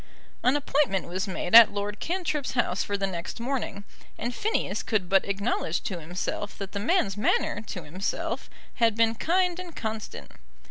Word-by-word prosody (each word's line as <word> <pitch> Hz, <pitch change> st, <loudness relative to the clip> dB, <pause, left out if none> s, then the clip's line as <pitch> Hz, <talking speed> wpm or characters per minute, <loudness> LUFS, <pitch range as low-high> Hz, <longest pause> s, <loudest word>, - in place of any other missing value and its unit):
An 255 Hz, +3 st, +3 dB
appointment 280 Hz, -8 st, +1 dB
was 185 Hz, +4 st, -2 dB
made 185 Hz, -1 st, -4 dB
at 230 Hz, -1 st, +11 dB
Lord 205 Hz, 0 st, -3 dB
Cantrip's 330 Hz, -6 st, -2 dB
house 235 Hz, -7 st, +1 dB
for 205 Hz, -, -2 dB
the 195 Hz, -, 0 dB
next 180 Hz, +2 st, -5 dB
morning, 235 Hz, -5 st, -3 dB, 0.3 s
and 240 Hz, +1 st, -3 dB
Phineas 435 Hz, -, -1 dB
could 210 Hz, -5 st, 0 dB
but 195 Hz, +1 st, +4 dB
acknowledge 200 Hz, -4 st, -1 dB
to 190 Hz, -7 st, -4 dB
himself 180 Hz, +5 st, -4 dB
that 195 Hz, -1 st, -6 dB
the 200 Hz, -, -3 dB
man's 210 Hz, -, +1 dB
manner 210 Hz, 0 st, +1 dB
to 180 Hz, -, -5 dB
himself 180 Hz, +6 st, -3 dB, 0.3 s
had 230 Hz, -3 st, +3 dB
been 225 Hz, 0 st, +3 dB
kind 355 Hz, -, +1 dB
and 355 Hz, -3 st, -8 dB
constant. 220 Hz, -1 st, -5 dB
210 Hz, 170 wpm, -27 LUFS, 195-260 Hz, 0.3 s, at